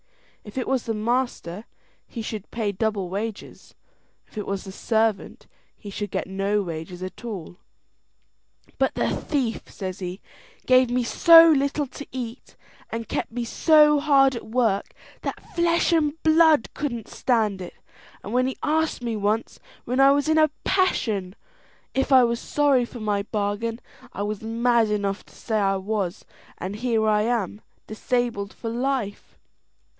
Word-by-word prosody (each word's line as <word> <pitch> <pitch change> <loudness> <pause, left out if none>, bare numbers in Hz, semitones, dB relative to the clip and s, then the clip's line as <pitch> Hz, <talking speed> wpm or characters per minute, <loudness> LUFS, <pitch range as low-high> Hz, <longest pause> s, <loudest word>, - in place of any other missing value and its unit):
If 210 +3 -11
it 255 - -2
was 265 -3 0
the 225 - -1
master, 220 -4 -2 0.4
he 230 - -6
should 215 -1 -4
also - - -44
pay 220 -3 -2
double 200 -1 -1
wages; 205 +4 -6 0.5
if - - -23
it 210 - -4
was 195 -1 -3
the 190 - -8
servant, 220 0 -1 0.3
he 205 - -9
should 205 +1 -4
get - - -2
no 195 +2 -1
wages 170 +1 -6
at 185 +5 -8
all. 190 -7 -7 1.2
"But - - +1
the - - 0
thief," 255 -7 -2
says 185 -1 -6
he, 180 0 -5 0.5
"gave 255 -1 +5
me 245 0 +1
so 330 +6 +8
little 285 0 +1
to 280 +2 -10
eat, 245 -1 -7 0.3
and 230 0 -5
kept - - -3
me 240 +1 -3
so 300 +3 +5
hard 275 -3 +4
at 235 - -7
work, 220 -4 0 0.3
that - - -6
flesh 340 0 +2
and 300 -3 +2
blood 315 -4 +4
couldn't 240 -7 -4
stand 215 -6 0
it; 180 - -8 0.5
and 205 - -6
when 255 +1 +2
he 265 - -4
asked 315 -3 0
me 230 -2 -2
once, 210 +2 -1 0.3
when 250 +2 -1
I 275 0 +7
was 285 +1 +1
in 315 0 +3
a 310 0 +5
passion, 215 - 0 0.6
if 270 +1 0
I 260 -1 +8
was 235 0 +1
sorry 280 -4 +2
for 240 - -10
my 210 -2 0
bargain, 210 +2 -2 0.3
I 200 - -4
was 210 0 -3
mad 230 0 +2
enough 200 -1 -1
to - - -20
say 220 -2 -2
I 195 -1 +2
was, 195 -2 -3 0.3
and 190 +3 -5
here 225 -2 +1
I 210 -1 +3
am 220 -3 -1 0.2
disabled 220 -2 -2
for 225 - -6
life." 245 -4 -3
230 Hz, 165 wpm, -24 LUFS, 205-260 Hz, 1.2 s, so